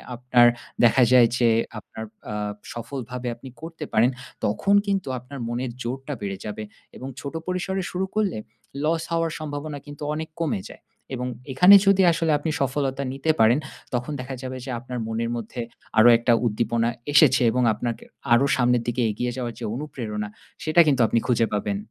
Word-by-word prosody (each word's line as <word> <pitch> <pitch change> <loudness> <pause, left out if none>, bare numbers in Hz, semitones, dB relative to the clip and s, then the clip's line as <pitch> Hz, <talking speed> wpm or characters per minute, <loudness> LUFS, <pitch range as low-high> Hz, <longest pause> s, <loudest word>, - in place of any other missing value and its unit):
আপনার 120 0 +4 0.4
দেখা 120 +2 +6
যায় 125 -2 +7
যে 120 -2 +4 0.3
আপনার 110 - -9 0.3
আ - - -3 0.4
সফলভাবে 125 +1 -6
আপনি 130 +3 -11
করতে 165 -1 -7
পারেন, 110 +3 +5 0.4
তখন 200 - +2
কিন্তু 195 -4 0
আপনার 130 +3 -10
মনের 120 +1 -3
জোরটা 135 +4 -4
বেড়ে 100 -1 -3
যাবে 105 0 -5 0.3
এবং 130 - -7
ছোট 140 +3 -6
পরিসরে 185 +1 -2
শুরু 185 +1 -1
করলে, 205 - +1 0.5
লস 160 +1 +1
হওয়ার 165 -1 0
সম্ভাবনা 145 -1 -5
কিন্তু 145 0 -9
অনেক 160 +1 -4
কমে 145 - 0
যায়। - - -13 0.3
এবং 125 0 -3 0.2
এখানে 180 +10 +8
যদি 195 -1 +5
আসলে 165 -1 0
আপনি 155 +3 -3
সফলতা 135 0 -1
নিতে 135 +4 +1
পারেন, 115 +5 +5 0.3
তখন 125 +3 -2
দেখা 130 +1 -5
যাবে 130 -1 -5
যে - - -7
আপনার 125 0 -6
মনের 115 +1 -2
মধ্যে 120 +1 -5 0.4
আরো 110 +2 +8
একটা 120 +1 +2
উদ্দীপনা 115 +1 +1 0.2
এসেছে 140 - +6
এবং 125 +2 +1
আপনাকে 120 +2 -4 0.3
আরো 120 +4 +5
সামনের 125 -1 +2
দিকে 120 +1 0
এগিয়ে 120 +4 -2
যাওয়ার 120 -2 -3
যে - - -4
অনুপ্রেরণা, 115 -7 -4 0.4
সেটা 155 +2 +5
কিন্তু 135 -4 +3
আপনি 115 - +2
খুঁজে 115 -3 +2
পাবেন। 105 -1 -1
125 Hz, 170 wpm, -24 LUFS, 120-150 Hz, 0.5 s, এখানে